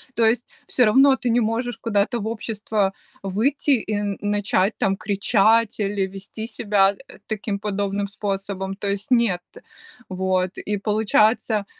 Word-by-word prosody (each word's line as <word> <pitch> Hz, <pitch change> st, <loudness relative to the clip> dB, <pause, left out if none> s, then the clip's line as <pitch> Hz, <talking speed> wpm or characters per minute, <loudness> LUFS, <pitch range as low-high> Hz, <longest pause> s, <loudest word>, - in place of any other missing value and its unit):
То 230 Hz, -, +3 dB
есть 235 Hz, +2 st, +2 dB, 0.2 s
всё 250 Hz, -, +3 dB
равно 270 Hz, +5 st, +6 dB
ты 245 Hz, -, -2 dB
не 235 Hz, +1 st, +3 dB
можешь 230 Hz, +2 st, -1 dB
куда-то 225 Hz, +2 st, 0 dB
в 215 Hz, -, -4 dB
общество 215 Hz, -3 st, -1 dB, 0.3 s
выйти 225 Hz, +10 st, 0 dB
и 220 Hz, -5 st, +1 dB
н 205 Hz, -1 st, -2 dB
начать 205 Hz, -1 st, 0 dB
там 195 Hz, -, +1 dB
кричать, 215 Hz, +3 st, +2 dB
или 200 Hz, -1 st, 0 dB
вести 195 Hz, +3 st, -8 dB
себя, 205 Hz, -4 st, +2 dB
э, -, -, -16 dB
таким 210 Hz, -2 st, -3 dB
подобным 200 Hz, -1 st, -2 dB
способом, 195 Hz, -1 st, -4 dB
то 200 Hz, +1 st, -5 dB
есть- 200 Hz, +5 st, -3 dB
нет. 225 Hz, -8 st, +3 dB, 0.7 s
Вот, 185 Hz, 0 st, -1 dB
и 210 Hz, 0 st, -2 dB
получается, 215 Hz, +1 st, +2 dB
205 Hz, 150 wpm, -22 LUFS, 195-225 Hz, 0.7 s, равно